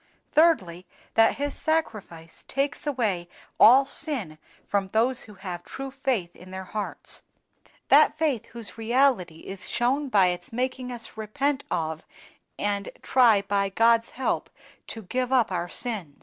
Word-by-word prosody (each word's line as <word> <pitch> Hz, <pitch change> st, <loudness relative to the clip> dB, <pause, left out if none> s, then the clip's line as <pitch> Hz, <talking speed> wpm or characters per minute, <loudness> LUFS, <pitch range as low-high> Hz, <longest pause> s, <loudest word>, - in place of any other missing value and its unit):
"Thirdly, 185 Hz, -, +2 dB, 0.3 s
that 225 Hz, 0 st, +4 dB
His 285 Hz, 0 st, -2 dB
Sacrifice 215 Hz, -, -3 dB
takes 280 Hz, +2 st, -2 dB
away 210 Hz, -11 st, -1 dB, 0.3 s
all 260 Hz, +5 st, +8 dB
sin 235 Hz, -, -3 dB, 0.3 s
from 200 Hz, -1 st, 0 dB
those 240 Hz, +6 st, +1 dB
who 210 Hz, -, -13 dB
have 180 Hz, -2 st, -7 dB
true 270 Hz, 0 st, -7 dB
faith 255 Hz, -10 st, -2 dB
in 185 Hz, -, -14 dB
their 190 Hz, 0 st, -6 dB
hearts; 210 Hz, +2 st, -3 dB, 0.7 s
that 300 Hz, +2 st, +6 dB
faith 300 Hz, -8 st, 0 dB
whose 225 Hz, -3 st, -9 dB
reality 225 Hz, -, +1 dB
is 195 Hz, 0 st, -5 dB
shown 265 Hz, +4 st, 0 dB
by 195 Hz, -6 st, +4 dB
its 180 Hz, 0 st, -9 dB
making 255 Hz, +1 st, -2 dB
us 235 Hz, -2 st, -6 dB
repent 270 Hz, +6 st, -1 dB
of 160 Hz, -1 st, -2 dB, 0.5 s
and 200 Hz, -1 st, -1 dB
try, 230 Hz, -6 st, +4 dB
by 200 Hz, 0 st, 0 dB
God's 230 Hz, +3 st, +3 dB
help, 265 Hz, -, -1 dB, 0.4 s
to 225 Hz, -, -6 dB
give 250 Hz, +6 st, -2 dB
up 245 Hz, -6 st, +3 dB
our 175 Hz, -1 st, -2 dB
sins." 195 Hz, -10 st, -3 dB
225 Hz, 145 wpm, -26 LUFS, 190-260 Hz, 0.7 s, all